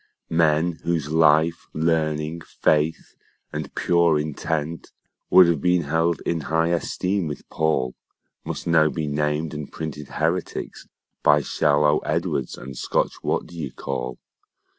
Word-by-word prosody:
Men 80 +1 +2
whose 80 -4 -1
life, 80 +1 +3
learning, 80 0 0
faith, 80 0 0 0.4
and 75 -1 -5
pure 85 -2 +3
intent, 75 +1 -3 0.4
Would 95 - +8
have 85 -4 +1
been 90 -1 +2
held 80 +1 0
in 85 - 0
high 80 +2 +1
esteem 90 +2 -1
with 75 - -7
Paul 80 -6 0 0.5
Must - - -5
now 80 -2 +4
be 80 -1 -3
named 75 +2 -1
and 75 -2 -6
printed 75 -2 -6
heretics 85 +3 -3 0.3
By 75 0 +5
shallow 75 0 +2
Edwards 65 -3 -2
and 65 0 -9
Scotch - - 0
What - - -1
d'ye 80 -5 -6
call. 65 -1 -5
80 Hz, 130 wpm, -23 LUFS, 75-85 Hz, 0.5 s, Would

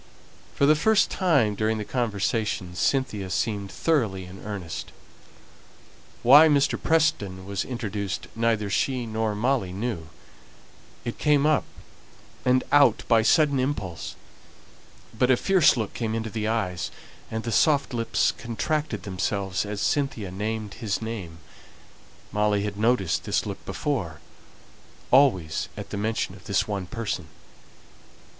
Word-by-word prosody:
For 140 - +3
the 150 - +6
first 215 +8 +3
time 140 - +2
during 110 +2 0
the 105 - -4
conversation 105 -5 -1
Cynthia 105 -2 0
seemed 100 0 -2
thoroughly 110 - 0
in 90 +2 -11
earnest. 95 -7 -6 1.3
Why 145 +6 +9
Mr. 145 -2 +2
Preston 100 -13 +1
was 100 -1 -2
introduced 105 -6 -4
neither 115 -2 +1
she 125 +6 0
nor 110 -1 -1
Molly 120 -3 0
knew; 95 -5 -4 1.0
it 120 - -5
came 150 -1 +3
up 155 -1 +3 0.8
and 130 0 +3
out 145 -1 +5
by 115 -2 +5
a - - +1
sudden 145 +1 +4
impulse; 105 - -3 1.0
but 125 +3 +2
a 130 - +5
fierce 185 -6 +4
look 110 -3 -3
came 110 -2 -2
into 110 -1 -3
the 110 0 -2
eyes, 105 -6 -1 0.4
and 110 0 -4
the 115 - -3
soft 140 +4 +3
lips 115 -1 +1
contracted 120 - -2
themselves 95 0 -2
as 105 -1 -4
Cynthia 135 -9 -1
named 105 +2 -3
his 105 -5 -2
name. 105 -8 -6 0.9
Molly 105 -1 +1
had 105 -1 -3
noticed 105 -5 +1
this - - 0
look - - -6
before, 95 - -2 0.9
always 95 - +3
at - - -7
the - - -3
mention 110 +2 -1
of - - -15
this - - +1
one 100 -3 -3
person. 115 +2 -4
110 Hz, 135 wpm, -25 LUFS, 100-130 Hz, 1.3 s, Why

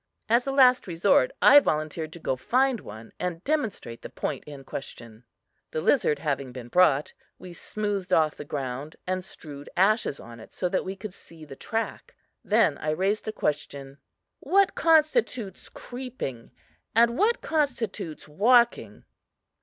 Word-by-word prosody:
As 235 +4 +2
a - - 0
last 255 -4 +5
resort, 180 - +3
I 290 - +9
volunteered 155 - -2
to 170 - -10
go 130 - -1
find 255 - +1
one, 110 - -11
and 180 -1 -4
demonstrate 225 - -2
the - - -8
point - - -4
in 145 -2 -10
question. 115 -4 -9 0.4
The - - -3
lizard 155 - +2
having 140 -3 -3
been 120 -1 -9
brought, 150 -4 +3 0.2
we 180 - -11
smoothed 200 0 -4
off 155 -3 +3
the - - -8
ground 140 +1 -5
and 185 0 -2
strewed 145 -6 -11
ashes 195 -5 +2
on 115 0 -11
it 110 - -14
so 180 - -1
that 185 - 0
we 190 +1 -5
could 195 0 -8
see 165 -3 -15
the 135 - -10
track. 225 - -4 0.3
Then - - +2
I 155 - -3
raised 190 +7 0
the 215 - -2
question: 140 -6 -4 0.4
"What 395 0 +3
constitutes 310 - +1
creeping, 245 - -7 0.5
and 235 +1 +4
what 440 - +2
constitutes 245 - -2
walking?" 205 - +2
180 Hz, 155 wpm, -26 LUFS, 145-235 Hz, 0.5 s, I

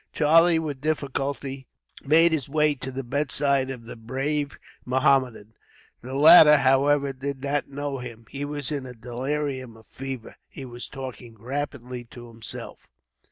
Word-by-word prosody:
Charlie, 165 +2 +5
with 150 -5 -4
difficulty, 140 -2 -3 0.4
made 165 +4 +5
his 145 -5 -2
way 150 0 +2
to 130 -1 -7
the 135 +1 -5
bedside 140 0 0
of 125 -3 -7
the - - -8
brave 140 +5 -3 0.3
Mohammedan. 130 -4 +1 0.5
The 130 +2 -7
latter, 150 +1 +9
however, 140 +1 +3
did 135 +1 -5
not 140 +1 -1
know 140 -1 -4
him. 115 -2 -9
He 140 +1 -5
was 145 -2 -4
in 145 -2 -2
the 125 -1 -9
delirium 130 +1 -4
of 110 - -18
fever. 135 -3 -8
He 135 - -9
was 120 -1 -8
talking 125 -4 -8
rapidly 125 0 -5
to 120 0 -12
himself. 115 -3 -7
135 Hz, 150 wpm, -25 LUFS, 125-145 Hz, 0.5 s, latter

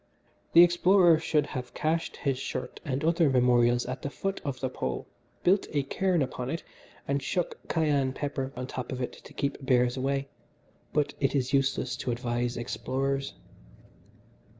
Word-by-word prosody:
"The 170 - +10
explorer 175 -1 +5
should 150 -3 +1
have 130 -4 -6
cached 165 +2 -1
his 135 -3 -1
shirt 125 - -5
and 140 -1 -2
other 165 -1 +3
memorials 120 -1 +4
at 130 +1 -5
the 140 - -3
foot 195 +6 -3
of 135 -3 -3
the 130 - -1
Pole, 130 - -3 0.4
built 190 +3 +3
a 145 -2 +2
cairn 180 +3 +1
upon 125 -1 -4
it, 165 +3 -3 0.4
and 140 0 0
shook 175 +6 -2
cayenne 145 -5 +1
pepper 135 -1 -3
on 125 0 -4
top 125 -1 -5
of 130 - -4
all 125 - +1
to - - -13
keep 140 0 -2
bears 125 -1 +3
away 135 +1 -1 0.6
but 150 -1 +1
it 135 0 +1
is 130 0 0
useless 135 -1 +1
to 125 - -4
advise 120 0 -1
explorers." 135 +3 -2
135 Hz, 165 wpm, -28 LUFS, 125-155 Hz, 0.6 s, The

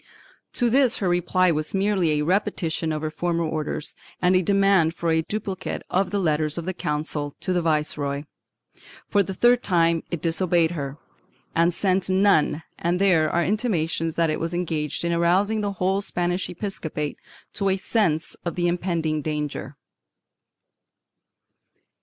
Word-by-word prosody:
To 240 -1 +1
this 260 -2 +4
her 195 - -1
reply 180 +1 +2
was 155 +3 -2
merely 195 -3 +2
a 150 0 0
repetition 175 -3 0
of 155 0 -3
her 155 - -2
former 170 +1 -1
orders 155 -1 -3 0.2
and 180 +1 +3
a 185 - +4
demand 195 -3 +3
for 170 -1 -1
a 160 0 +3
duplicate 195 +1 -4
of 190 +2 +1
the 205 - -1
letters 155 -4 0
of 170 - -4
the 185 - -2
Council 150 -3 -2
to 185 - -1
the 175 - +1
Viceroy. 150 -3 0 0.8
For 205 - +3
the 190 0 -4
third 245 +3 +4
time 170 -4 +2
it 170 - -3
disobeyed 165 0 +1
her 140 -4 -5 0.6
and 170 +1 +3
sent 190 +1 0
none 185 -5 +3 0.2
and 175 +1 0
there 175 -6 +3
are 170 +2 +1
intimations 165 -7 0
that 165 -2 +2
it - - -2
was 165 +1 -2
engaged 160 -3 -2
in 170 - +1
arousing 190 +6 +2
the 205 -1 -2
whole 190 +1 0
Spanish 180 -1 -1
episcopate 160 -5 -4 0.3
to 195 -1 0
a 190 - +1
sense 185 -6 0
of 170 - -3
the 175 -1 +1
impending 170 -3 -1
danger. 150 -2 -4
170 Hz, 160 wpm, -24 LUFS, 160-190 Hz, 0.8 s, this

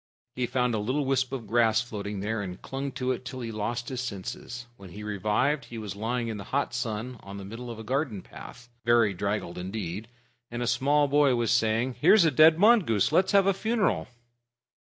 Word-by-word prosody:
He 125 -1 -1
found 125 -1 0
a 110 - 0
little 130 +7 -1
wisp 130 -1 +1
of 130 -4 -5
grass 110 0 +3
floating 105 -4 -5
there, 110 +1 -2
and 90 -2 -6
clung 135 +1 -5
to 130 0 -1
it 130 - -3
till 130 0 -7
he 115 -1 -4
lost 115 +3 -3
his 130 -2 -3
senses. 120 +2 -6
When 100 -5 -12
he 105 +4 -9
revived, 105 +8 0
he 120 - -9
was 105 -2 -6
lying 115 +3 -2
in 110 -2 -4
the 100 - -8
hot 140 -2 -1
sun 120 0 -4
on 100 0 -9
the 100 - -7
middle 115 +4 -8
of 115 - -6
a 110 - -8
garden 125 -4 -2
path, 120 0 -12 0.2
very 115 -3 +4
draggled 100 -2 -3
indeed, 95 +2 -5 0.4
and 120 +1 -3
a - - -1
small 145 +4 +2
boy 140 -2 +4
was 120 -2 0
saying, 115 +2 +1
"Here's 210 -6 +6
a 160 - +4
dead 155 +4 +6
mongoose. 180 - +4
Let's 185 +6 +3
have 200 -1 +5
a 195 - +4
funeral." 220 +2 0
120 Hz, 210 wpm, -27 LUFS, 105-135 Hz, 0.4 s, Here's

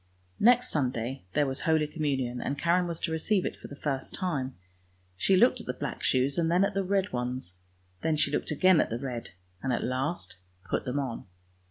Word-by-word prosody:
Next 245 +2 +5
Sunday 130 -4 -1
there 145 0 +3
was 135 0 -2
Holy 160 -1 +2
Communion, 135 -5 -1
and 140 - -2
Karen 175 +4 +2
was 170 -2 -3
to - - -1
receive 180 +4 +1
it - - -2
for - - -10
the 140 - -9
first 140 -2 -3
time. 145 -9 -2 0.6
She 190 - +3
looked 245 +3 +5
at - - -13
the - - -2
black 145 - -4
shoes 135 +4 +2
and 165 -1 +2
then 180 +3 +4
at 200 - -2
the 195 0 0
red 195 +1 0
ones 125 -6 -3 0.3
— 90 0 -37
then 160 - +1
she 155 - +1
looked - - -1
again 175 +2 +5
at - - -1
the 115 - -2
red, 125 -2 -5 0.3
and 130 - -1
at 120 - 0
last 130 - -2 0.3
put - - -1
them 125 +2 -2
on. 130 -5 -3
145 Hz, 215 wpm, -29 LUFS, 130-175 Hz, 0.6 s, Next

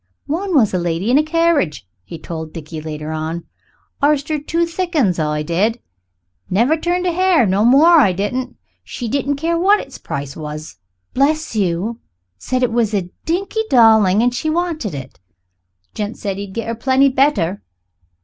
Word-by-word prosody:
"One 355 +4 -2
was 225 -9 +4
a 185 - +1
lady 175 +5 -1
in 270 - +5
a - - +3
carriage," 310 - +1 0.2
he 165 - -9
told 160 0 -7
Dickie 155 -1 -7
later 155 0 -6
on. 160 +2 -4 0.6
"Arst 290 +1 +2
'er 305 - 0
two 330 +3 0
thick 345 +1 -4
'uns, 200 - +2
I 150 -1 -1
did. 200 +9 0 0.7
Never 235 +11 +3
turned 350 +3 -1
a 355 - +2
hair, 360 -5 +3
no 195 +2 +1
more 305 +8 +6
I 210 -10 +4
didn't. 205 +8 -3 0.3
She 240 - -6
didn't 280 +4 -1
care 335 +4 -1
what 400 +4 +4
its - - -9
price 140 0 -5
was, 155 - -7 0.4
bless 300 0 +1
you. 200 +3 -1 0.4
Said 255 0 -1
it 245 - +1
was 225 -2 +1
a 180 -3 -2
dinky 390 +6 -1
darling 220 -4 +5
and 245 0 +2
she 310 +6 -2
wanted 315 - -2
it. 135 -1 -9 0.7
Gent 210 +2 -4
said 195 -2 -4
he'd 200 -1 -7
get 230 - -3
her 230 - -1
plenty 265 +4 +3
better. 260 - +1
235 Hz, 175 wpm, -18 LUFS, -, 0.7 s, more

